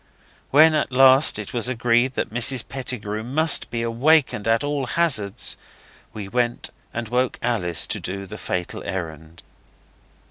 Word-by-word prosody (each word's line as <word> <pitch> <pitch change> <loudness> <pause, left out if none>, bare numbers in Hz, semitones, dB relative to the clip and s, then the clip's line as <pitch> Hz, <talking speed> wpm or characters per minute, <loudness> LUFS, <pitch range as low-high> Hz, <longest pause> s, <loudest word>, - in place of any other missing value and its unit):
When 155 +3 +6
at 150 -3 -1
last 130 +1 +5
it 105 -2 -6
was 120 0 0
agreed 120 +1 +1
that - - -3
Mrs 120 +1 0
Pettigrew 120 -5 -5
must 145 +7 +3
be 115 -1 -3
awakened 120 -1 +1
at 115 +4 +2
all 145 -2 -2
hazards, 120 - 0 0.5
we 105 -2 -7
went 120 +3 -1 0.2
and 120 -1 -5
woke 125 +2 -1
Alice 95 -9 0
to - - -4
do 100 +1 -6
the 105 +3 -10
fatal 90 -1 -4
errand. 80 -2 -7
120 Hz, 145 wpm, -22 LUFS, 105-130 Hz, 0.5 s, When